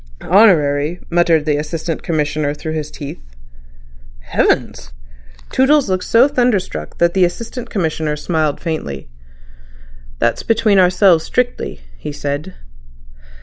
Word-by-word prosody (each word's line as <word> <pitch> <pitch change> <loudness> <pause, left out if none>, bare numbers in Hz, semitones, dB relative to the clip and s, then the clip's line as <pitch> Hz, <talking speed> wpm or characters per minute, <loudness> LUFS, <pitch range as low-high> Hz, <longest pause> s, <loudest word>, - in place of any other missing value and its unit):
"Honorary," 165 -5 +3
muttered 170 -3 +3
the 150 -2 +1
Assistant 160 +2 -4
Commissioner 150 -2 -1
through 155 +1 -5
his 155 -1 -4
teeth. 140 - -8 1.0
"Heavens!" - - -1 0.6
Toodles 270 -2 +3
looked 185 -1 -1
so 235 +4 +5
thunderstruck 210 - -1
that 170 0 +2
the 190 - +3
Assistant 230 +7 -3
Commissioner 160 -5 -1
smiled 155 -1 -1
faintly. 70 - -5 1.1
"That's - - 0
between 220 -3 +2
ourselves 180 -2 +4
strictly," 245 - -2 0.2
he - - -5
said. 145 - -4
165 Hz, 110 wpm, -17 LUFS, 150-195 Hz, 1.1 s, so